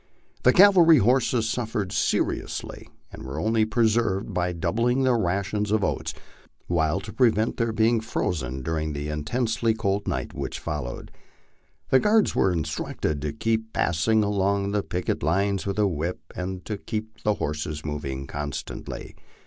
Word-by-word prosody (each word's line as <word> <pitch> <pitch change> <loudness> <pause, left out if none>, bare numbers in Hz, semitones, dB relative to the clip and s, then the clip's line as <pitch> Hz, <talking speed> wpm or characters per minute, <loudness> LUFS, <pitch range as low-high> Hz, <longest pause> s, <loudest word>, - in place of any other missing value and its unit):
The 125 - +6
cavalry 175 -2 +7
horses 120 0 +2
suffered 110 -4 -2
seri - - +1
ously, - - -7 0.2
and - - -10
were 65 +3 -5
only 110 +5 +2
preserved 110 -3 +1
by 90 0 0
doubling 115 +9 0
their 130 -2 +3
ration 100 0 0
of 110 -2 +2
oats, - - -2 0.5
while 85 0 +1
to 105 0 -9
pre 120 +2 +5
vent 110 +1 -1
their 115 -1 0
being 110 +1 +2
frozen 80 - -2
during 80 0 -2
the 75 +1 -4
intensely 110 +9 0
cold 100 -2 -1
night - - -2
which - - -4
followed, 70 -5 -5 0.8
the 130 - +6
guards 210 - +3
were 95 - +3
instructed 80 -2 -2
to 75 0 -2
keep 110 +7 -1
passing 105 +7 +2
along 100 0 +1
the 105 0 +1
picket 90 -3 -2
lines 100 +5 +1
with 100 - -2
a 105 - +3
whip, 85 0 -4
and 90 0 -5
to 105 - -3
keep 110 +1 -5
the 105 -1 +1
horses 75 -1 -4
moving 70 -3 -4
constantly. 75 0 -6
100 Hz, 155 wpm, -25 LUFS, 80-110 Hz, 0.8 s, cavalry